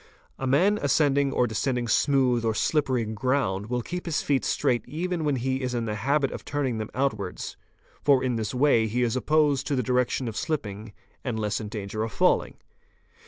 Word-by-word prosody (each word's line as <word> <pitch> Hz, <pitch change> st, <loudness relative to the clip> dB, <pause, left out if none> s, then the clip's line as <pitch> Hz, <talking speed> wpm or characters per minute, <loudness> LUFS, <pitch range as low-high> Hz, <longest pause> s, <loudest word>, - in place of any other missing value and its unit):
"A 135 Hz, -, -2 dB
man 190 Hz, +11 st, +3 dB
ascending 140 Hz, -2 st, +2 dB
or 125 Hz, -, +2 dB
descending 120 Hz, +2 st, -1 dB
smooth 130 Hz, -2 st, +2 dB
or 110 Hz, -1 st, 0 dB
slippery 130 Hz, -3 st, +1 dB
ground 110 Hz, -3 st, -1 dB
will 125 Hz, 0 st, -2 dB
keep 180 Hz, +5 st, -5 dB
his 160 Hz, -, 0 dB
feet 140 Hz, -2 st, +1 dB
straight 120 Hz, -1 st, +1 dB
even 175 Hz, +2 st, -2 dB
when 145 Hz, -2 st, +1 dB
he 130 Hz, +1 st, -1 dB
is 125 Hz, -1 st, -2 dB
in 120 Hz, -1 st, -1 dB
the 105 Hz, -, -2 dB
habit 135 Hz, +6 st, +1 dB
of -, -, -7 dB
turning 135 Hz, -6 st, -2 dB
them 110 Hz, -, -4 dB
out 135 Hz, 0 st, +2 dB
wards, 90 Hz, -2 st, -6 dB, 0.5 s
for 140 Hz, -3 st, +4 dB
in 125 Hz, -2 st, 0 dB
this 110 Hz, -2 st, -2 dB
way 125 Hz, -4 st, +3 dB
he 120 Hz, +3 st, 0 dB
is 120 Hz, 0 st, 0 dB
opposed 145 Hz, +1 st, +2 dB
to 145 Hz, -, 0 dB
the 125 Hz, -, 0 dB
direction 125 Hz, +1 st, 0 dB
of 110 Hz, -, -5 dB
shipping 110 Hz, -10 st, -3 dB, 0.3 s
and 120 Hz, -4 st, -2 dB
less 105 Hz, 0 st, -1 dB
in 105 Hz, -, -5 dB
danger 105 Hz, 0 st, -4 dB
of 110 Hz, 0 st, -2 dB
falling. -, -, +2 dB
125 Hz, 200 wpm, -26 LUFS, 110-140 Hz, 0.5 s, for